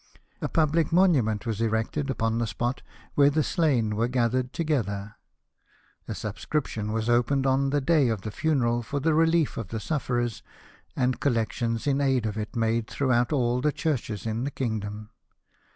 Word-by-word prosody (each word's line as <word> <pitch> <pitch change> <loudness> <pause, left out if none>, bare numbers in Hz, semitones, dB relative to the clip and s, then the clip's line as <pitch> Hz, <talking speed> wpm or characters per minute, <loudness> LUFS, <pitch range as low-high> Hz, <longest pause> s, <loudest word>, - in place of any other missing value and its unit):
A - - -2
public 160 0 +2
monument 140 - +3
was 110 -2 -2
erected 115 +6 -1
upon 115 -3 0
the 115 - 0
spot 120 +4 -2 0.3
where 140 -1 +5
the 155 +1 +1
slain 130 -12 +1
were 115 +2 +1
gathered 125 0 0
together. 105 - -2 0.9
A - - -4
subscription 105 +1 -3
was 110 0 -1
opened 125 +3 +2
on 135 +1 +2
the 145 +1 +1
day 145 -1 +3
of 110 -4 -2
the 110 - -5
funeral 120 -2 +1
for 140 +5 -3
the 160 +3 +2
relief 165 0 +2
of 115 - -4
the 110 +3 -4
sufferers, 120 -4 -2 0.5
and 125 -1 0
collections 115 -2 -1
in 140 -1 +1
aid 135 -4 +2
of 105 -2 -2
it 110 0 -5
made 115 -1 0
throughout 125 -3 +1
all 125 -3 +1
the 150 +2 +2
churches 125 -10 -2
in 115 +2 -2
the 140 - -1
kingdom. 110 -4 -4
120 Hz, 170 wpm, -26 LUFS, 110-145 Hz, 0.9 s, where